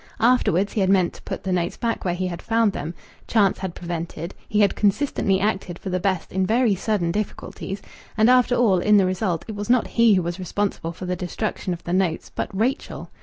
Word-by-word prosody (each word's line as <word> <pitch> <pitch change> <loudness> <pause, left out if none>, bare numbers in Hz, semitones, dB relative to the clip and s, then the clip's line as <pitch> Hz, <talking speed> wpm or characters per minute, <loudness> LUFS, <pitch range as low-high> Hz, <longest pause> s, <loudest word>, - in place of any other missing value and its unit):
Afterwards 215 -5 +3
he 210 - 0
had 190 - +2
meant 185 -3 +3
to - - -14
put - - -6
the 190 - -2
notes 175 -1 -1
back 230 -1 -2
where 175 -2 0
he 185 +1 -2
had 175 -2 -4
found 225 -3 +2
them; 165 +4 -5 0.3
chance 205 -4 +3
had 190 -3 -4
prevented; 170 0 -5 0.2
he 210 0 +2
had 200 - +3
consistently 200 -2 +1
acted 190 -4 -1
for 190 - -6
the 185 - 0
best 185 -2 -1
in 190 0 0
very 230 +3 +3
sudden 195 -3 0
difficulties, 195 0 -5 0.3
and 220 +1 +5
after 250 0 +5
all, 210 -7 +3
in 210 +4 +4
the 195 - +4
result, 185 -2 -1
it 220 - -5
was 205 +1 -5
not 250 -1 +4
he 230 -3 +4
who 185 - +1
was 175 +2 -4
responsible 185 -2 -2
for 175 +2 -8
the 180 0 -1
destruction 185 +2 -3
of 175 - -5
the 175 - -3
notes, 185 -3 0
but - - -3
Rachel.... 230 +8 -2
190 Hz, 220 wpm, -23 LUFS, 180-215 Hz, 0.3 s, and